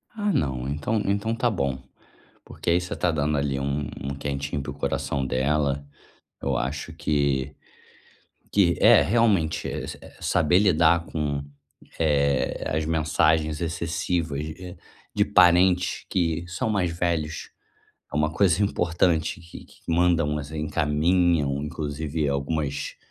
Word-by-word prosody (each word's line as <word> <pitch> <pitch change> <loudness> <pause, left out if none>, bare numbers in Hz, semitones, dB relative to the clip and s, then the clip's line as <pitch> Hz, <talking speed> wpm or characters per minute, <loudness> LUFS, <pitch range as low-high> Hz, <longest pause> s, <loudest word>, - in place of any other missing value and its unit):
Ah 205 -1 0
não, 65 - -1
então 75 +10 -1
então 100 +3 0
tá 120 +1 +1
bom, 70 -9 -1 0.7
porque - - -8
aí 85 +1 +3
você 90 - -5
tá 90 - 0
dando 75 -1 0
ali 70 -1 -1
um 70 +1 -2
um 70 +1 -3
quentinho 70 +1 -3
para - - -5
o - - -8
coração 70 -1 -2
dela. 70 +2 0 0.6
Eu - - 0
acho 70 +4 -3
que 70 -3 0 1.0
que 90 -4 +3
é - - +7
realmente, 100 -8 +2
eh, - - -4 0.3
saber 90 0 +3
lidar 85 -3 +3
com, 75 -3 -2 0.6
eh, 70 -4 +1
as 80 +2 -1
mensagens 80 -1 +1
excessivas 80 -2 -2 0.7
de - - +3
parentes 90 +1 +4
que 85 -2 0
são 90 +5 -3
mais 100 -5 +1
velhos. 80 -3 -2 0.6
É - - -3
uma 75 0 +2
coisa 95 +2 +2
importante 85 -4 +1
que 85 0 -12
que - - -21
mandam 85 -3 +2 0.2
encaminham 80 -1 +1
inclusive 75 0 -3
algumas 70 +1 -2
80 Hz, 125 wpm, -25 LUFS, 70-90 Hz, 1.0 s, é